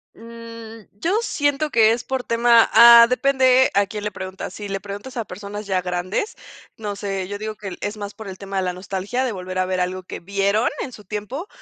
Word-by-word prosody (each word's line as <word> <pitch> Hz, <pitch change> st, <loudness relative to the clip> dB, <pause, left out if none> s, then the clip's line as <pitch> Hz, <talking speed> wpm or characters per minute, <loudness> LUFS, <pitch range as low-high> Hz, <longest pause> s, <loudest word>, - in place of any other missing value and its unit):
Mm, 230 Hz, -1 st, -10 dB
yo 335 Hz, -, -1 dB
siento 290 Hz, -2 st, 0 dB
que 220 Hz, -1 st, +5 dB
es 235 Hz, +1 st, -1 dB
por 265 Hz, -1 st, -3 dB
tema, 235 Hz, 0 st, +4 dB
ah, 235 Hz, 0 st, +10 dB
depende 260 Hz, 0 st, +4 dB
a 200 Hz, 0 st, +3 dB
quién 210 Hz, -1 st, -6 dB
le 210 Hz, -, -2 dB
preguntas. 190 Hz, 0 st, -7 dB
Si 210 Hz, -, -7 dB
le 195 Hz, 0 st, -2 dB
preguntas 205 Hz, +6 st, -8 dB
a 230 Hz, -, -2 dB
personas 205 Hz, +2 st, -7 dB
ya 190 Hz, -2 st, 0 dB
grandes, 180 Hz, -, -3 dB, 0.4 s
no 205 Hz, -2 st, -4 dB
sé, 195 Hz, -2 st, -3 dB
yo 205 Hz, +1 st, -6 dB
digo 215 Hz, 0 st, -5 dB
que 205 Hz, -2 st, -7 dB
el 185 Hz, -, -8 dB
es 205 Hz, +1 st, -3 dB
más 205 Hz, 0 st, -6 dB
por 220 Hz, -, -10 dB
el 190 Hz, -1 st, -7 dB
tema 195 Hz, 0 st, -6 dB
de 190 Hz, -, +1 dB
la 180 Hz, -1 st, -1 dB
nostalgia 195 Hz, +7 st, -3 dB
de 250 Hz, -, -1 dB
volver 185 Hz, -2 st, -6 dB
a 185 Hz, -, +2 dB
ver 185 Hz, 0 st, -2 dB
algo 185 Hz, +1 st, -2 dB
que -, -, -8 dB
vieron 200 Hz, +4 st, +1 dB
en 260 Hz, -, -5 dB
su 210 Hz, -3 st, -12 dB
tiempo 210 Hz, -, -5 dB
210 Hz, 225 wpm, -22 LUFS, 195-235 Hz, 0.4 s, ah